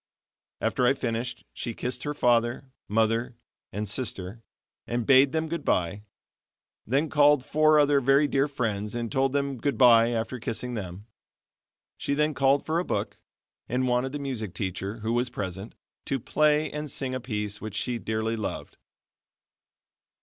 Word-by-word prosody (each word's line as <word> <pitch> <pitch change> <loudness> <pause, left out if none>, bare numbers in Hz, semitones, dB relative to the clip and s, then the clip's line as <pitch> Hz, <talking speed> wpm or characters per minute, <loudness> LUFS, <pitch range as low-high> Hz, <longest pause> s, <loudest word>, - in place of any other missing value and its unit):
After 125 - +1
I 135 - +4
finished, 120 -2 -3
she 115 -2 -5
kissed 125 +2 -3
her 150 0 -2
father, 120 +1 +1 0.2
mother, 115 +3 +1 0.4
and 105 +2 -3
sister 105 -1 -3 0.5
and 120 -1 -1
bade 135 +2 +6
them 160 +1 -1
goodbye; 105 - -1 0.9
then 140 +7 +1
called 145 -3 +4
four 155 0 +4
other 145 -1 +4
very 135 +3 +4
dear 140 0 +1
friends 110 -6 -3
and 115 -2 -3
told 135 +2 +2
them 140 -1 -1
goodbye 120 -4 +5
after 120 +2 -2
kissing 120 +2 -3
them. 95 -2 -6 0.9
She 140 - -1
then 150 +1 +1
called 135 0 +2
for 160 +2 0
a - - 0
book - - -3 0.5
and 130 +1 0
wanted 125 +1 +1
the 145 - -3
music 125 -9 -4
teacher, 100 +3 -4
who 110 +2 -1
was 120 +1 +1
present, 95 +1 -6 0.3
to 135 - -1
play 150 +5 +2
and 150 0 -5
sing 130 -1 -3
a 130 - -2
piece 105 -4 -4
which 110 -2 -6
she 120 +1 -1
dearly 110 +1 -2
loved. 110 - -5
125 Hz, 155 wpm, -27 LUFS, 110-140 Hz, 0.9 s, bade